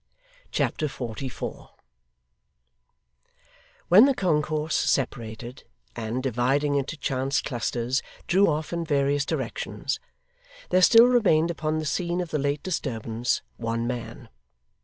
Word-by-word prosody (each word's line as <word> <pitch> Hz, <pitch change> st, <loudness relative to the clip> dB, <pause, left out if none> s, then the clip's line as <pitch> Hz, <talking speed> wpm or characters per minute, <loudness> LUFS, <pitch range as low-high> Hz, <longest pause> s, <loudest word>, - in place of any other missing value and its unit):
Chapter 155 Hz, -, 0 dB
44 125 Hz, -1 st, -6 dB, 2.2 s
When 205 Hz, +8 st, +8 dB
the 275 Hz, -1 st, +2 dB
concourse 155 Hz, -4 st, 0 dB
separated, 120 Hz, -2 st, -2 dB, 0.3 s
and, 115 Hz, +2 st, -3 dB
dividing 135 Hz, +4 st, +1 dB
into 140 Hz, +2 st, -1 dB
chance 135 Hz, 0 st, 0 dB
clusters, 120 Hz, 0 st, -1 dB, 0.2 s
drew 195 Hz, +3 st, +4 dB
off 155 Hz, +1 st, -1 dB
in 170 Hz, 0 st, -1 dB
various 145 Hz, -2 st, +1 dB
directions, -, -, -3 dB, 0.7 s
there 185 Hz, -, +4 dB
still 230 Hz, +5 st, +8 dB
remained 180 Hz, -10 st, +3 dB
upon 155 Hz, -1 st, -2 dB
the 155 Hz, -, -3 dB
scene 175 Hz, +4 st, -1 dB
of 175 Hz, -2 st, -4 dB
the 150 Hz, -, 0 dB
late 140 Hz, +1 st, -1 dB
disturbance, 120 Hz, -, -2 dB
one 115 Hz, 0 st, -2 dB
man. 120 Hz, 0 st, -5 dB
140 Hz, 115 wpm, -26 LUFS, 125-160 Hz, 2.2 s, When